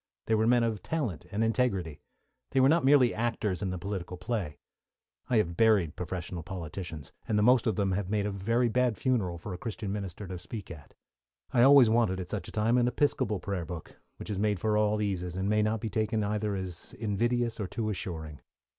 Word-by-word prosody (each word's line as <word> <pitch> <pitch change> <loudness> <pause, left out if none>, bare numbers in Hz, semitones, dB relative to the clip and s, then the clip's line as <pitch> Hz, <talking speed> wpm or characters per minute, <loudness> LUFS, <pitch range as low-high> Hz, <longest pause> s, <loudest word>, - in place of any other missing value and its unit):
They 110 - 0
were 110 0 +3
men 120 0 +4
of 110 -4 -1
talent 110 - -3
and 110 +2 0
integrity. 100 - 0 0.5
They 135 - +1
were 130 - +6
not 165 0 +3
merely 135 -3 +5
actors 110 -5 -1
in 100 - -1
the 90 - -3
political 90 -1 -5
play. 90 -5 -3 0.7
I 120 - +3
have 85 -5 +1
buried 100 -7 +3
professional 90 -1 -5
politicians, 85 -3 -7
and 105 - +1
the 105 - +3
most 125 +1 +5
of 110 - +1
them 100 -3 +1 0.2
made 105 -1 0
a 105 - -1
very 115 +5 +1
bad 125 -1 +1
funeral 105 -10 0
for 90 +3 -7
a 90 - -7
Christian 110 -3 -4
minister 100 0 -5
to 90 -1 -6
speak 95 +3 -8
at. 75 -4 -12 0.6
I 120 - +4
always 135 -1 +8
wanted, 110 -4 +2
at 90 - -6
such 100 -5 -3
a - - -8
time, 115 +3 +2
an 120 - +3
Episcopal 120 -6 +1
prayer 95 -3 -3
book, 80 0 -8 0.2
which - - -6
is 100 - -2
made 105 -2 +1
for 105 +2 +1
all 105 0 +2
eases, 90 -3 -2
and 95 +1 -1
may 105 +1 +3
not 110 +1 +1
be 110 - -3
taken 110 +2 0
either 105 0 -1
as 95 -3 -6
invidious 115 +3 -1
or 100 - -2
too 110 +3 -3
assuring. 80 -7 -5
105 Hz, 210 wpm, -29 LUFS, 90-115 Hz, 0.7 s, always